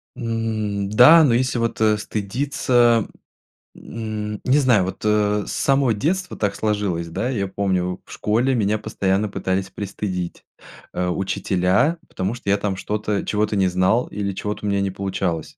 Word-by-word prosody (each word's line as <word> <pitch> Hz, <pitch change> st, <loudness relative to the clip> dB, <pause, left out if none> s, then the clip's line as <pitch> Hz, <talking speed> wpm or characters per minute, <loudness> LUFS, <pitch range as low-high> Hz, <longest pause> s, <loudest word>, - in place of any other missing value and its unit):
М, 110 Hz, -4 st, -2 dB
да, 140 Hz, +10 st, +8 dB
но 125 Hz, -5 st, +3 dB
если 125 Hz, 0 st, +1 dB
вот, 115 Hz, -1 st, -2 dB
э, 105 Hz, -1 st, +4 dB
стыдиться, 120 Hz, +2 st, +1 dB, 0.7 s
м, 105 Hz, -2 st, -5 dB
не 130 Hz, +3 st, +3 dB
знаю, 125 Hz, -8 st, +4 dB
вот, 95 Hz, -, -6 dB
э, 105 Hz, -1 st, +2 dB
с -, -, -6 dB
самого 135 Hz, -4 st, +2 dB
детства 180 Hz, -, -2 dB
так 105 Hz, -2 st, -1 dB
сложилось. 100 Hz, -6 st, -1 dB
Да, 120 Hz, +9 st, -2 dB
я 100 Hz, -7 st, -1 dB
помню 95 Hz, -2 st, -1 dB
в -, -, -16 dB
школе 120 Hz, +5 st, +1 dB
меня 105 Hz, -1 st, +1 dB
постоянно 100 Hz, 0 st, -1 dB
пытались 95 Hz, 0 st, -2 dB
пристыдить, 95 Hz, -2 st, -5 dB, 0.5 s
э, 90 Hz, 0 st, -1 dB
учителя, 95 Hz, -, +1 dB
потому 95 Hz, +4 st, -3 dB
что 125 Hz, -5 st, -6 dB
я 100 Hz, -, +4 dB
там 100 Hz, -2 st, -2 dB
что-то 105 Hz, +1 st, -2 dB
чего-то 105 Hz, 0 st, 0 dB
не 95 Hz, -1 st, +3 dB
знал 95 Hz, +7 st, +2 dB
или 100 Hz, -1 st, -3 dB
чего-то 105 Hz, +2 st, -4 dB
у -, -, 0 dB
меня 100 Hz, 0 st, +1 dB
не 100 Hz, -, 0 dB
получалось. 95 Hz, -4 st, -3 dB
105 Hz, 160 wpm, -21 LUFS, 95-115 Hz, 0.7 s, да